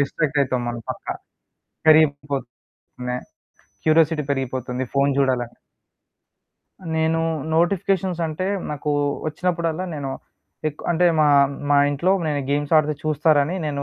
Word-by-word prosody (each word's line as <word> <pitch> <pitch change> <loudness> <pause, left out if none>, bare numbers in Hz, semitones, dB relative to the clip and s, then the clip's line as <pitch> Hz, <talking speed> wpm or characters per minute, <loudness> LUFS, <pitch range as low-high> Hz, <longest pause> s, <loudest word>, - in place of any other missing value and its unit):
Distract 145 +1 0
అయితాం 130 -2 -1
మనం 120 -1 -4
పక్కా. - - -5 0.7
పెరిగిపోతుంది, 145 -5 +2 1.2
curiosity 155 -1 +3
పెరిగిపోతుంది, 130 -1 -2
ఫోను 140 0 +3
చూడాలని. 125 -3 0 1.4
నేను 160 +1 +1 0.4
నోటిఫికేషన్స్ 185 0 +1
అంటే 160 +4 -3 0.2
నాకు 150 0 -3 0.4
వచ్చినప్పుడల్లా 170 +1 -1
నేను 140 -2 -4 0.6
ఎక్ 150 - -10
అంటే 175 +1 +3
మా, 150 - +5 0.4
మా 145 - +5
ఇంట్లో 170 +7 +1 0.2
నేను 145 -1 0
గేమ్స్ 145 +1 -1
ఆడితే 150 0 +3
చూస్తారని 155 +1 +2
నేను 140 -1 -2
150 Hz, 110 wpm, -22 LUFS, 140-165 Hz, 1.4 s, మా